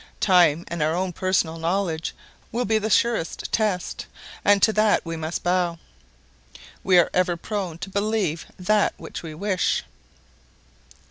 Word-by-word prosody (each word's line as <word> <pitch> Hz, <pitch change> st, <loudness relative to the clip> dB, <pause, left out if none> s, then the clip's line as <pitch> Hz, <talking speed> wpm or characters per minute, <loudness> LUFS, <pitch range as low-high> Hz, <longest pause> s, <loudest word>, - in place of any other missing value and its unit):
Time 175 Hz, -4 st, +4 dB
and 170 Hz, -1 st, -4 dB
our 155 Hz, +2 st, +1 dB
own 185 Hz, 0 st, -1 dB
personal 175 Hz, -3 st, 0 dB
knowledge 165 Hz, -1 st, -1 dB, 0.4 s
will 245 Hz, +2 st, -1 dB
be 220 Hz, +1 st, +2 dB
the 215 Hz, +1 st, -2 dB
surest 225 Hz, -7 st, 0 dB
test, 210 Hz, -5 st, -1 dB, 0.4 s
and 205 Hz, 0 st, +5 dB
to 220 Hz, -, +5 dB
that 215 Hz, -2 st, +3 dB
we 165 Hz, 0 st, -4 dB
must 160 Hz, +1 st, -4 dB
bow. 175 Hz, -1 st, +1 dB, 1.1 s
We 185 Hz, -1 st, +4 dB
are 175 Hz, -, +4 dB
ever 180 Hz, -1 st, +1 dB
prone 185 Hz, -3 st, -4 dB
to 195 Hz, -, -7 dB
believe 200 Hz, -5 st, -1 dB
that 205 Hz, +3 st, +2 dB
which -, -, -8 dB
we 160 Hz, -2 st, -8 dB
wish. 190 Hz, +2 st, 0 dB
180 Hz, 145 wpm, -24 LUFS, 165-205 Hz, 1.1 s, and